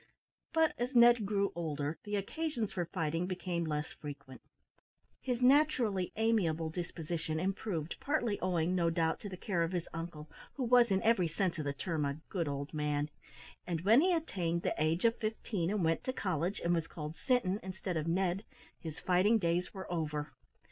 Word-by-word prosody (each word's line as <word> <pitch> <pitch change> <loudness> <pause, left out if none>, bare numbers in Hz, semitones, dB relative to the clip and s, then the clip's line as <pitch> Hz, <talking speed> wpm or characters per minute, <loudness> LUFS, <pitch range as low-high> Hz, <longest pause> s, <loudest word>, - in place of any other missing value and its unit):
But 320 -1 +3
as 250 +2 -2
Ned 235 -3 +7
grew 200 -1 +1
older, 150 -2 -3
the 205 0 -2
occasions 235 +2 -2
for 175 -2 -1
fighting 165 0 -1
became 180 -2 -2
less 150 -1 -1
frequent; 145 -3 -9 0.8
his 250 -1 -1
naturally 250 - +3
amiable 175 -8 +1
disposition 160 -2 -3
improved, 185 -3 -2
(partly 240 -8 0
owing, 175 -1 +1
no 170 -2 +2
doubt, 165 -1 +1
to 205 - -6
the 185 - -7
care 180 -2 -1
of 165 +2 0
his 175 -2 -2
uncle, 165 -2 -6 0.3
who 270 - -2
was, 240 -1 +5
in 190 -1 +1
every 220 -6 +4
sense 170 +1 -1
of 155 - -3
the 140 - 0
term, 155 +1 -2
a 140 +1 -2
good 170 -5 -1
old 140 +1 -4
man,) 150 0 -1 0.6
and 170 -3 -1
when 220 +9 +6
he 365 +2 +3
attained 180 - -1
the - - +1
age 160 +6 +1
of 230 0 +3
fifteen 215 -5 -2
and 205 -2 0
went 165 0 +1
to 255 - -1
college, 180 - -1
and 170 - +2
was 165 -1 0
called 150 0 -6
"Sinton," 215 -6 +1
instead 185 -1 -4
of 155 0 -1
"Ned," 185 +3 +1 0.4
his 160 -3 -7
fighting 185 +5 +3
days 175 -2 0
were 190 -2 -7
over. 150 -3 -2
180 Hz, 185 wpm, -33 LUFS, 160-215 Hz, 0.8 s, Ned